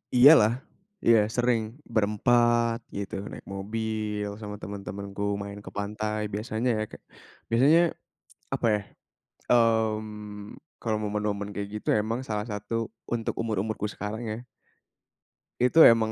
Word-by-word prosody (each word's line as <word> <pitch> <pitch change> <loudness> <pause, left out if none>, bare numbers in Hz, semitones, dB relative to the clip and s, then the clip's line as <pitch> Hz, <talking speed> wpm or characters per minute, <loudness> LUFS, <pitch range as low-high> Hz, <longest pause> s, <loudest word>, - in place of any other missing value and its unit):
Iya 135 +5 +10
lah, 105 +1 +4 0.5
iya 115 -1 +7 0.2
sering. 120 -2 +2 0.3
Berempat 115 +2 +3 0.2
gitu, 100 -2 -4 0.2
naik - - -9
mobil 105 0 -2
sama 105 -1 -6
teman-temanku, 100 0 -6 0.2
main 100 0 -7
ke - - -8
pantai 105 +1 -2
biasanya 110 +3 -1
ya - - 0
ke - - -9 0.6
biasanya, 140 +9 +6 0.7
apa - - 0
ya. 105 - 0 0.7
Mmm, 110 -3 0 0.2
kalau 110 -2 0
momen-momen 105 -1 -2
kayak 100 0 -4
gitu - - -26
emang 115 +3 -2
salah 105 -1 -1
satu 105 +2 -5 0.4
untuk 115 -1 -1
umur-umurku 110 -1 -2
sekarang 105 +2 -5
ya, 110 - -3 1.2
itu 125 +6 +2 0.2
emang, 110 -1 0
110 Hz, 125 wpm, -27 LUFS, 105-115 Hz, 1.2 s, Iya